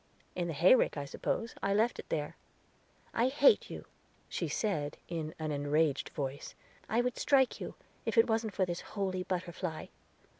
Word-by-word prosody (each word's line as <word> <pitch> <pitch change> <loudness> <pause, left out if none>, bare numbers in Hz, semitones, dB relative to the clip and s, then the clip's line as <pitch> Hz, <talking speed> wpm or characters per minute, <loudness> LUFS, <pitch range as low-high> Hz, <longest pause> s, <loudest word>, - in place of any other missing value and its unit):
"In 175 -1 -2
the 165 - -3
hayrick, 180 - +5
I 145 - -3
suppose, 225 +10 -2
I 195 0 +1
left 225 +3 +2
it - - -8
there." 150 -2 -2 0.8
"I 235 +2 +3
hate 295 - +5
you," - - -7 0.4
she - - -2
said, 155 -9 -1
in 160 -3 -4
an 155 -1 -3
enraged 145 0 +1
voice. 140 -1 -5 0.3
"I 225 +3 +3
would 250 0 -2
strike 265 -3 +3
you, - - -5 0.3
if - - -2
it 225 - +8
wasn't 220 -2 0
for 190 - +2
this 175 -1 -4
holy 190 -3 -2
butterfly." 180 -2 -3
180 Hz, 165 wpm, -32 LUFS, 155-225 Hz, 0.8 s, it